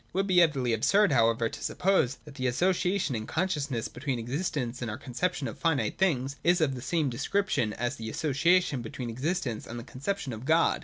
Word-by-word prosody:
It - - -35
would 195 +2 +1
be 185 -2 +5
utterly 135 -8 +2
absurd, 195 - +3
however, 115 -2 +3
to - - -8
suppose 180 -8 +1
that 150 - -11
the 130 -2 -2
association 180 +4 +1
in 110 -1 -4
consciousness 150 -9 -1
between 130 0 -3
existence 125 0 -3
and 120 - -2
our 105 - -4
conception 145 +3 -2
of - - -7
finite 165 -5 0
things 140 -7 +1
is 175 +1 +4
of 150 -4 +2
the 125 - -6
same 155 +2 0
description 140 - 0
as 120 +2 -2
the 110 -1 -5
association 155 +2 +2
between 120 +1 -5
existence 130 -2 -2
and 120 +1 -6
the - - -7
conception 140 +3 -4
of 110 +1 -7
God. 160 +4 +3
140 Hz, 200 wpm, -28 LUFS, 120-175 Hz, -, be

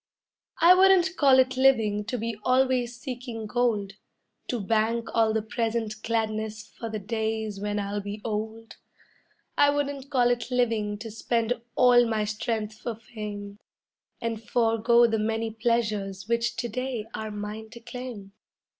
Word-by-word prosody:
I 345 +2 +8
wouldn't 375 -1 +5
call 275 -5 +5
it 260 0 +3
living 225 -6 +3
to 245 +3 -3
be 230 0 -3
always 255 -1 +2
seeking 245 -3 -6
gold, 210 -3 0 0.5
To 245 - -2
bank 225 +3 0
all 225 -1 +3
the 220 -1 0
present 225 -1 -2
gladness 220 -1 -2
for 230 - -8
the 215 - -3
days 220 0 -3
when 205 +1 -2
I'll 205 0 -2
be 205 +1 -6
old. 220 +1 -4 0.8
I 285 - +7
wouldn't 285 -1 -2
call 245 -3 +3
it 240 0 -2
living 225 -5 0
to 220 +1 -7
spend 230 +1 0 0.2
all 245 -1 +6
my 220 -2 0
strength 215 0 -3
for 235 - -4
fame, 210 -2 -8 0.6
And 230 -1 -3
forego 230 +1 +3
the 225 -1 +1
many 225 +1 -1
pleasures 215 -4 -1
which 235 0 0
to 240 - -2
day 250 -1 -3
are 215 0 -4
mine 210 +1 -6
to 235 +1 -11
claim. 235 -4 -8
225 Hz, 150 wpm, -27 LUFS, 215-245 Hz, 0.8 s, I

